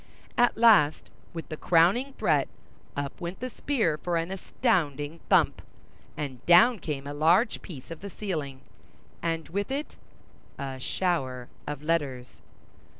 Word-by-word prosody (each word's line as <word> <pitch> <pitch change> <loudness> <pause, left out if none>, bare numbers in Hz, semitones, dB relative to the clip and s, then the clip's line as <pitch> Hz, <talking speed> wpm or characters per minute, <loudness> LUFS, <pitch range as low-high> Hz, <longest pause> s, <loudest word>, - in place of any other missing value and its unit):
At 240 0 +3
last, 215 -11 +5 0.2
with 165 -1 -7
the 155 - -5
crowning 185 - +3
threat, - - +2 0.5
up 145 0 -4
went 175 +2 -5
the 255 0 -4
spear 220 - 0
for 175 +1 -1
an 165 +2 -2
astounding 165 - -1
thump, - - +4 0.6
and 130 -4 -5
down 220 +7 +7
came 140 -5 -4
a 145 - -5
large 170 - +3
piece 160 -4 -10
of 165 - -8
the 200 - -6
ceiling, 155 -10 -4 0.6
and 165 -1 -2
with 200 +6 -2
it—a 140 - -8
shower 130 -6 -1 0.2
of 145 0 -5
letters. 140 -6 -2
165 Hz, 135 wpm, -27 LUFS, 145-200 Hz, 0.6 s, down